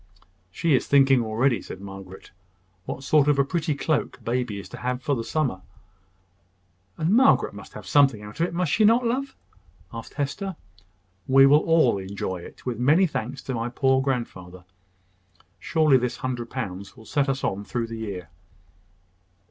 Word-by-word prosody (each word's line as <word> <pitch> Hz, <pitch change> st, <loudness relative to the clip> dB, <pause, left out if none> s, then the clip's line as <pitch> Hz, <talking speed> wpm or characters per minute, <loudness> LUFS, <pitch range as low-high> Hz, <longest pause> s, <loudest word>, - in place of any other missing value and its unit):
"She 160 Hz, -, 0 dB
is 130 Hz, -, +2 dB
thinking 135 Hz, -2 st, +5 dB
already," 115 Hz, +3 st, +1 dB
said -, -, -9 dB
Margaret, 95 Hz, -1 st, -10 dB, 0.5 s
"what 135 Hz, -, -6 dB
sort 145 Hz, +1 st, +3 dB
of 145 Hz, -1 st, +3 dB
a 140 Hz, -, +4 dB
pretty 155 Hz, 0 st, -1 dB
cloak 150 Hz, +1 st, -1 dB
baby 120 Hz, -3 st, -2 dB
is 100 Hz, -, -9 dB
to -, -, -9 dB
have 125 Hz, 0 st, -2 dB
for 145 Hz, -, 0 dB
the 115 Hz, -, -3 dB
summer." 130 Hz, -10 st, -1 dB, 1.4 s
"And 160 Hz, +3 st, 0 dB
Margaret 260 Hz, +5 st, +4 dB
must -, -, -11 dB
have -, -, -9 dB
something 135 Hz, -7 st, +3 dB
out 105 Hz, +5 st, -11 dB
of 170 Hz, -, +2 dB
it, -, -, -8 dB
must 175 Hz, -4 st, 0 dB
not 225 Hz, +3 st, +5 dB
she, 240 Hz, -, -1 dB
love?" 265 Hz, +3 st, -2 dB, 0.6 s
asked -, -, -8 dB
Hester. 180 Hz, +7 st, -3 dB, 0.7 s
"We 135 Hz, +1 st, +7 dB
will 145 Hz, +2 st, +6 dB
all 155 Hz, -11 st, +3 dB
enjoy 95 Hz, -1 st, -4 dB
it, -, -, -13 dB
with 120 Hz, -3 st, -3 dB
many 150 Hz, +9 st, +4 dB
thanks 130 Hz, -4 st, -4 dB
to 130 Hz, -, -4 dB
my 115 Hz, 0 st, -2 dB
poor 130 Hz, +1 st, +2 dB
grandfather. 95 Hz, -9 st, -4 dB, 0.9 s
Surely 155 Hz, -5 st, +3 dB
this 125 Hz, -1 st, -2 dB
hundred 120 Hz, -2 st, -4 dB
pounds 100 Hz, -4 st, -6 dB
will 110 Hz, -, -14 dB
set 140 Hz, +4 st, 0 dB
us 135 Hz, 0 st, -2 dB
on 100 Hz, +1 st, -1 dB
through 120 Hz, +2 st, -3 dB
the 115 Hz, 0 st, -7 dB
year." 95 Hz, -6 st, -6 dB
130 Hz, 170 wpm, -25 LUFS, 110-150 Hz, 1.4 s, We